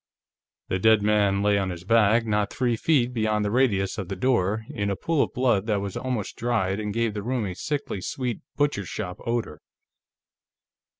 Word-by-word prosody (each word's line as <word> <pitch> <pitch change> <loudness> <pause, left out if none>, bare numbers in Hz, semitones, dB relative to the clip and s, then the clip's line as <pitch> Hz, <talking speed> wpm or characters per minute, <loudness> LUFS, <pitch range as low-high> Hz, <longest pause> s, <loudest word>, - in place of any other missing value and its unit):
The 95 - 0
dead 110 +1 +4
man 100 -2 +2
lay 105 -1 +3
on 95 -1 -1
his 90 -1 -6
back, 115 +2 +4
not 105 -2 0
three 120 -2 0
feet 125 -1 +2
beyond 110 -2 0
the 100 - -1
radius 110 -5 +1
of 95 - -4
the 95 - -3
door, 110 -4 +1
in 100 -1 -2
a 100 - 0
pool 160 - 0
of - - 0
blood 120 -5 +1
that 105 -3 +1
was 100 -1 -5
almost 125 -6 -3
dried 100 -5 0
and 105 -1 -3
gave 115 0 0
the 105 - -4
room 120 +1 -1
a 95 - -3
sickly 140 0 -3
sweet 125 +2 -3 0.2
butchershop 100 -9 -2
odor. 115 -10 -2
105 Hz, 185 wpm, -25 LUFS, 100-120 Hz, 0.2 s, dead